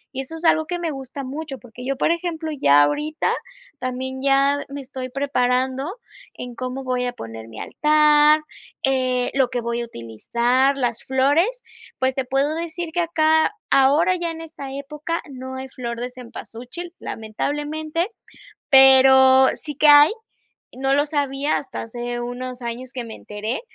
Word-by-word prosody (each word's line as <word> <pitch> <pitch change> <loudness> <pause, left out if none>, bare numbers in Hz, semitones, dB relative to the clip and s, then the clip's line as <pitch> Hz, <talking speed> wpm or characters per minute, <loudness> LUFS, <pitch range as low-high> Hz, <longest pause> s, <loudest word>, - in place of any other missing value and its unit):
Y 270 - -1
eso 270 +5 -8
es 325 +1 -6
algo 315 -1 +4
que 355 - -2
me 335 -2 -2
gusta 270 0 -7
mucho, 280 +1 -6
porque 245 0 -12
yo, 275 0 -2
por 305 - +2
ejemplo, 335 -2 -3
ya 145 +1 +6
ahorita 300 - 0 0.5
también 260 +1 -4
ya 275 +1 +3
me 280 0 -6
estoy 260 -1 -7
preparando 260 +1 0 0.4
en 245 -1 -7
cómo 255 +2 -5
voy 250 -1 -1
a 245 - -3
poner 115 - -9
mi 110 -1 -10
altar, 300 0 +4 0.4
eh, 255 -2 +1
lo 265 -2 +3
que 245 -1 -2
voy 235 0 -2
a - - -3
utilizar, 235 - 0
las 240 -3 -1
flores, 275 +7 +3 0.5
pues 260 0 +1
te 265 - -2
puedo 275 +3 0
decir 335 0 -4
que 350 - +1
acá 315 0 +2 0.2
ahora, 295 +7 +4
ya 345 -1 -2
en 325 - -8
esta 305 -4 -8
época, 300 +4 -4 0.2
no 260 +1 -7
hay 265 0 -6
flor 235 -2 -6
de 250 +1 -4
cempasúchil, 250 +6 -9
lamentablemente, 295 +9 -3 0.7
pero 265 -1 +7
sí 295 -1 -8
que 300 +2 +4
hay, 290 +1 +9 0.6
no 270 +1 0
lo 290 +1 +3
sabía 285 -1 0
hasta 275 - -6
hace 240 +1 -5
unos 250 +1 -6
años, 240 +2 -5
que 250 - -4
me 225 - -8
enteré 215 +4 -5
265 Hz, 165 wpm, -22 LUFS, 250-300 Hz, 0.7 s, hay